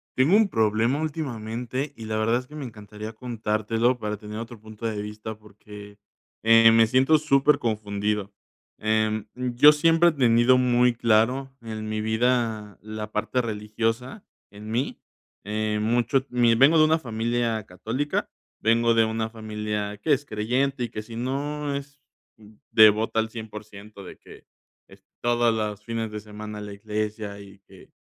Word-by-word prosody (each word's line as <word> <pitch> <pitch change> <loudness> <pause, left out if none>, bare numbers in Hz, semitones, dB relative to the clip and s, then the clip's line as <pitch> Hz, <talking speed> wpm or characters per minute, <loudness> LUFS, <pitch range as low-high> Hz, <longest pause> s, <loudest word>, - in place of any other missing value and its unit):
Tengo 140 +9 +4
un 215 -2 +4
problema 110 +4 +1
últimamente 130 -3 -4
y 110 - -9
la 110 0 -2
verdad 110 +2 +2
es 125 - -11
que 150 - -12
me 145 -3 -5
encantaría 105 -1 -9
contártelo 115 +1 -1
para 105 -1 -3
tener 105 +1 -8
otro 115 0 -8
punto 110 +1 -7
de 110 -2 -3
vista 105 +1 -7
porque, 105 -1 -13 0.5
eh, 115 0 +7
me 115 0 +5
siento 130 +6 +4
súper 145 -1 +3
confundido. 105 -2 -2 0.5
Em, 110 0 0
yo 125 +3 +5
siempre 165 +3 +4
he - - 0
tenido 125 -3 +4
muy 125 -1 +3
claro 120 +4 +2
en 110 -1 -6
mi 110 0 -2
vida 110 -2 0
la 110 0 -7
parte 110 +4 -1
religiosa 115 - -3 0.3
en 105 +1 -9
mí, 125 +5 -2 0.4
eh, 105 +1 -2
mucho 120 +4 +1
mi 120 -2 +3
vengo 140 +7 +5
de 155 - +7
una 160 +1 +3
familia 115 -2 -1
católica, 115 +11 -3 0.3
vengo 115 +1 +3
de 115 -1 +4
una 110 0 -2
familia 105 -2 -4
que 145 +9 +1
es 145 +1 -1
creyente 125 +4 -1
y 120 - -3
que 105 - -6
si 115 +1 -10
no 140 +4 -3
es 140 +1 -8 0.7
devota 110 +1 +5
al 110 0 0
100% 105 -2 -10
de 90 - -11
que - - -16 0.4
es - - -18 0.2
todas 120 -1 +2
las 105 -2 -3
fines 115 -1 -4
de 105 - -5
semana 105 0 -8
la 105 -1 -7
iglesia 105 0 -4
y 100 -1 -14
que 95 -1 -17
110 Hz, 160 wpm, -25 LUFS, 105-125 Hz, 0.7 s, eh